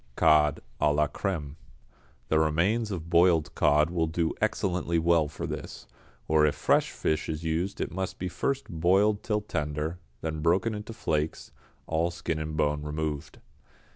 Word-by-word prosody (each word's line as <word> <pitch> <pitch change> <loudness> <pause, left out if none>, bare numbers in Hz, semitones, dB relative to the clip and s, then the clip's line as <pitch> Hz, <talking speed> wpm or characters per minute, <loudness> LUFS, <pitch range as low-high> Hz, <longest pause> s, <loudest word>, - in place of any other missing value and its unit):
=Cod, 75 -2 +4 0.2
à 75 - +4
la 75 0 +3
Crème.= 75 -3 -4 0.7
The 80 - +3
remains 90 +9 +1
of 85 -4 -5
boiled 85 -3 +4
cod 75 +1 +3
will 85 -2 +1
do 80 0 0
excellently 90 -3 0
well 85 -1 +3
for 75 +1 -6
this, - - -6 0.4
or 80 -1 +4
if 75 - +3
fresh - - +2
fish 80 +1 -1
is 80 +1 -3
used 85 +5 -1
it - - -2
must 95 +1 -3
be 90 - -3
first 135 +10 -2
boiled 95 +5 +2
till 105 -1 -1
tender, 80 -2 -3 0.2
then 80 -1 -3
broken 95 +7 +2
into 105 +1 -6
flakes, 80 -8 -2 0.3
all 80 +1 0
skin 85 -2 -3
and 75 0 -4
bone 75 -1 +1
removed. 75 -1 -4
80 Hz, 160 wpm, -28 LUFS, 75-90 Hz, 0.7 s, =Cod